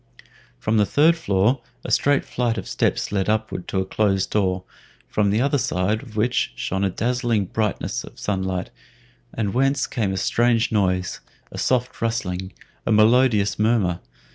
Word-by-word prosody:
From 110 - 0
the 105 - +4
third 160 +3 +4
floor 120 - +1 0.2
a - - -4
straight 145 -1 +3
flight 120 -2 -1
of 95 - -5
steps - - 0
led 100 0 0
upward 110 -4 -1
to 95 - -1
a - - -3
closed 95 -1 0
door, 95 -3 0 0.4
from 105 -1 +1
the 105 +4 +2
other 140 +1 +2
side 105 -1 0
of 115 -6 -13
which 120 +3 0
shone 95 +1 -2
the 100 - +2
dazzling 115 0 0
brightness 105 +1 -2
of - - -13
sunlight, 95 -2 -2 0.6
and 105 -3 -2
whence 135 +2 +2
came 105 -5 -2
a 95 - -2
strange 115 +4 +2
noise 90 -4 0 0.3
a - - -6
soft 125 -1 0
rustling, 95 -5 -2 0.3
a - - -1
melodious 110 -2 +4
murmur. 105 -6 +2
105 Hz, 165 wpm, -22 LUFS, 95-120 Hz, 0.6 s, the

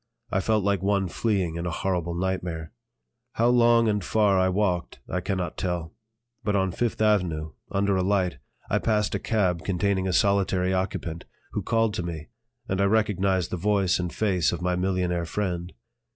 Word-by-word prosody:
I 95 - +2
felt 105 +1 +1
like 100 -2 +1
one 100 -1 +1
fleeing 90 -4 -1
in 85 +1 -3
a - - 0
horrible 85 -1 -2
nightmare. 90 -3 -3 0.6
How 115 +1 +3
long 120 -1 +5
and 105 -2 +1
far 100 -2 +3
I 95 0 +3
walked 90 -3 -1
I 90 - -2
cannot 90 -3 -3
tell; 85 -3 -2 0.5
but 105 0 0
on 95 -1 +1
Fifth 120 +5 -1
Avenue, 85 -8 +1 0.2
under 100 0 +1
a 95 - +1
light, 90 -7 +1 0.3
I - - +1
passed 105 -3 +1
a - - 0
cab 90 -7 0
containing 95 0 0
a 95 - 0
solitary 95 -1 +2
occupant, 90 -3 -3 0.3
who - - -2
called 115 -2 +1
to 90 - -2
me, 80 -3 -6 0.4
and 95 +1 0
I - - +4
recognized 100 -4 +1
the 90 - -2
voice 95 -1 +2
and 90 -1 -2
face 90 - +1
of - - -3
my 90 0 0
millionaire 90 -2 0
friend. 90 -1 -3
95 Hz, 180 wpm, -26 LUFS, 90-100 Hz, 0.6 s, long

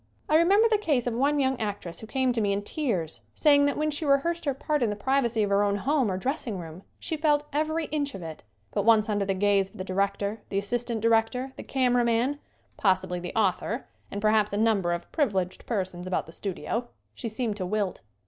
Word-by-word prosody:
I 305 - +2
remember 390 +7 +5
the 435 -2 +2
case 290 - +1
of 245 - -1
one 280 +5 +2
young 265 -2 +1
actress 200 -5 -4
who 220 - -9
came 260 +1 +1
to 235 -2 0
me 200 -1 +2
in 200 +1 -2
tears 205 - -2
saying 285 -2 +5
that 285 - 0
when 305 0 0
she 295 +2 -4
rehearsed 310 +4 +1
her 280 - +1
part 295 +1 -1
in 235 - +2
the 210 - -2
privacy 235 0 +1
of 200 - -1
her 200 +1 +4
own 200 0 +1
home, 260 +3 +1
or 185 - -1
dressing 250 -1 -2
room, 165 0 -8 0.2
she 325 - -3
felt 295 -1 +2
every 315 +2 0
inch 290 -3 -1
of 190 - -7
it, 160 -1 -7 0.3
but - - 0
once 220 0 +4
under 205 -1 +1
the 195 0 0
gaze 200 0 +2
of 215 - -16
the 185 - -4
director, 200 +2 -1
the 195 - -2
assistant 235 +3 -1
director, 230 +4 +1
the - - -7
cameraman, 245 +1 +1 0.4
possibly 185 -2 +1
the 175 0 -7
author 220 +3 0 0.2
and 205 - -5
perhaps 215 -1 +3
a 205 - -1
number 210 -5 +2
of 175 0 -4
privileged 195 - -1
persons 185 -5 -3
about 185 - -1
the 165 - -12
studio, 205 +6 -3 0.3
she 230 - -5
seemed 220 -1 -2
to 185 - -3
wilt. 205 -1 -1
225 Hz, 220 wpm, -27 LUFS, 200-275 Hz, 0.4 s, remember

